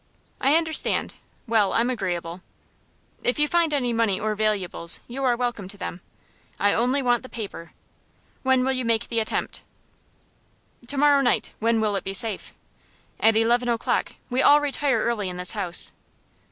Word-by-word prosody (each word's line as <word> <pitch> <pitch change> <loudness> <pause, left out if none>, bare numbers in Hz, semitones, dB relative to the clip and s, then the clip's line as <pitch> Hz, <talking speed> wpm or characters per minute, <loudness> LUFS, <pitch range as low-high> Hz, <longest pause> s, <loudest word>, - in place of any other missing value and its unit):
"I 275 +3 +3
understand. 325 -1 +1 0.3
Well, 220 -4 +2
I'm 240 +2 +2
agreeable." 180 -6 -4 0.8
"If 245 - +1
you 300 0 +3
find 335 0 +2
any 250 -5 0
money 225 -4 +1
or 215 0 -1
valuables, 205 -5 -1
you 265 +3 -5
are 250 -2 +3
welcome 240 -6 -3
to 200 - -9
them. 180 -2 -6 0.6
I 205 0 +3
only 255 +4 +1
want 245 -1 +2
the 255 - -11
paper. 200 -7 -7 0.7
When 260 -1 +2
will 265 - +1
you 255 -1 -1
make 230 -1 0
the 230 - 0
attempt?" 220 - -2 1.3
"To 280 - 0
morrow 285 0 +5
night. 240 -4 +1
When 230 0 +2
will 215 -2 0
it 195 - -2
be 195 - -4
safe?" 220 -2 0 0.7
"At 225 0 +4
eleven 240 +2 +2
o'clock. 230 -1 -1 0.2
We 255 +2 +2
all 290 +2 +6
retire 280 -4 0
early 215 -5 -1
in 180 - -7
this 180 -1 +1
house. 185 -5 -2
230 Hz, 165 wpm, -24 LUFS, 205-255 Hz, 1.3 s, all